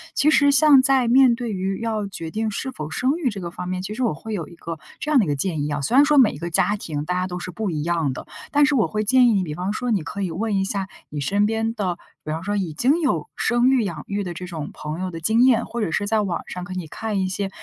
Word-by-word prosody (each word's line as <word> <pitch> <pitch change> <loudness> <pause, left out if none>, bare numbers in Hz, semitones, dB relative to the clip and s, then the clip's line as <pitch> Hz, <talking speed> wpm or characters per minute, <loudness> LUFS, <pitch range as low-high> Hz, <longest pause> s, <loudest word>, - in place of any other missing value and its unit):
其 305 - +4
实 285 -2 +5
像 285 -1 +7
在 265 -3 +3
面 255 -1 +6
对 235 -1 -4
于 190 0 -2
要 220 -3 -2
决 165 -4 -7
定 220 +3 -1
是 265 +6 -4
否 150 - -6
生 260 - 0
育 310 -7 0
这 200 -4 -6
个 170 -1 -5
方 180 +1 -6
面， 185 0 -2
其 195 +3 -5
实 240 - -5
我 240 - +2
会 215 +8 -7
有 170 -7 -3
一 170 - -14
个 165 -1 -7 0.2
这 300 - -2
样 290 - +6
的 215 - +3
一 - - -5
个 145 - 0
建 155 +1 -2
议 150 - -2
啊， 145 -1 -2
虽 140 - 0
然 285 - +8
说 295 0 +3
每 255 -5 +6
一 140 - -9
个 170 +3 -4
家 205 +5 +2
庭 150 -7 -4
大 180 +4 -2
家 180 0 0
都 180 -1 -5
是 180 - -6
不 215 +3 -3
一 155 -2 -2
样 165 -5 0
的。 - - -8 0.2
但 290 0 +5
是 290 0 +2
我 225 - +3
会 215 0 -2
建 250 +3 +5
议 235 - +4
你 195 -2 +2
比 155 -4 -5
方 185 +4 -2
说， 250 +3 -3
你 200 -7 +1
可 200 +5 -5
以 190 - -1
问 210 +5 -1
一 195 - +2
下 195 -1 -2 0.2
你 150 - -5
身 200 +9 +1
边 225 +1 -1
的， 185 -6 -2 0.3
比 - - -7
方 160 +1 -3
说 205 +2 -1
已 185 -6 -2
经 270 - +2
有 305 - 0
生 240 +1 +2
育、 260 -3 +3
养 170 -7 -4
育 200 0 -2
的 175 -2 -5
这 180 - -6
种 165 -4 -6
朋 155 +2 -6
友 185 0 -2
的 165 -2 -7
经 220 +8 +3
验， 235 -3 +4
或 235 - -5
者 195 -6 -1
是 205 - 0
在 215 +1 +1
网 190 -4 -2
上 180 - -6
可 185 +1 -7
以 185 -2 -4
看 215 +4 -3
一 190 - 0
些 195 +1 -3
200 Hz, 335 characters per minute, -22 LUFS, 175-235 Hz, 0.3 s, 然